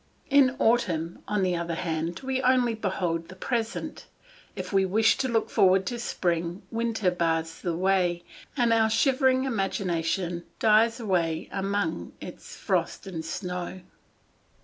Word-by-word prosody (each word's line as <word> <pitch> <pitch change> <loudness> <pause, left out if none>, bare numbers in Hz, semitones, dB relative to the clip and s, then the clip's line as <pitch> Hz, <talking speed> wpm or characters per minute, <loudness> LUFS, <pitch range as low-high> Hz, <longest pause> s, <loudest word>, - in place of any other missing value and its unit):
In 270 -2 +5
autumn, 175 -10 +1
on 210 -2 0
the 180 -1 +1
other 170 -1 -2
hand, 165 +2 -3
we 260 0 -1
only 250 -2 +3
behold 180 -6 -2
the 185 - -11
present; 230 +3 -3 0.5
if - - -6
we 195 0 +4
wish 215 +4 +3
to 265 - 0
look 225 -3 +1
forward 190 0 +4
to 240 +4 -3
spring, 175 -4 -2
winter 225 -4 0
bars 165 -2 -1
the 175 -2 -1
way, 180 -2 +1 0.3
and 240 -2 +3
our 220 -1 +4
shivering 260 +3 +3
imagination 180 -6 -1
dies 225 +2 +4
away 170 -7 -1
among 195 - -2
its - - -10
frost - - -1
and 170 -4 -5
snow. 180 +2 -5
190 Hz, 140 wpm, -27 LUFS, 170-230 Hz, 0.5 s, In